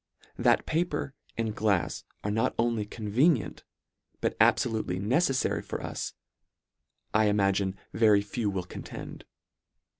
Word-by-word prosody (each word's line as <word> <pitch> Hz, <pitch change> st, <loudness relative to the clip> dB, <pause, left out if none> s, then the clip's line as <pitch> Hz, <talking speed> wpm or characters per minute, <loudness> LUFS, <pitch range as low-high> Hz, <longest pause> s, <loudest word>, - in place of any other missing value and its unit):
That -, -, +3 dB
paper 155 Hz, -4 st, -1 dB, 0.2 s
and 110 Hz, -2 st, -1 dB
glafs 100 Hz, -4 st, 0 dB, 0.2 s
are 105 Hz, -, -1 dB
not 115 Hz, +4 st, +1 dB
only 115 Hz, -3 st, +1 dB
convenient, 115 Hz, +7 st, +1 dB, 0.6 s
but -, -, -1 dB
abfolutely 110 Hz, -6 st, +2 dB
neceifary 130 Hz, -, +1 dB
for -, -, -5 dB
us, -, -, -5 dB, 1.0 s
I 110 Hz, 0 st, +4 dB
imagine 100 Hz, -2 st, +2 dB, 0.2 s
ve 110 Hz, 0 st, +4 dB
ry 105 Hz, -1 st, +6 dB
few 105 Hz, +1 st, -2 dB
will 95 Hz, -2 st, -2 dB
contend. -, -, -8 dB
110 Hz, 120 wpm, -29 LUFS, 100-120 Hz, 1.0 s, ry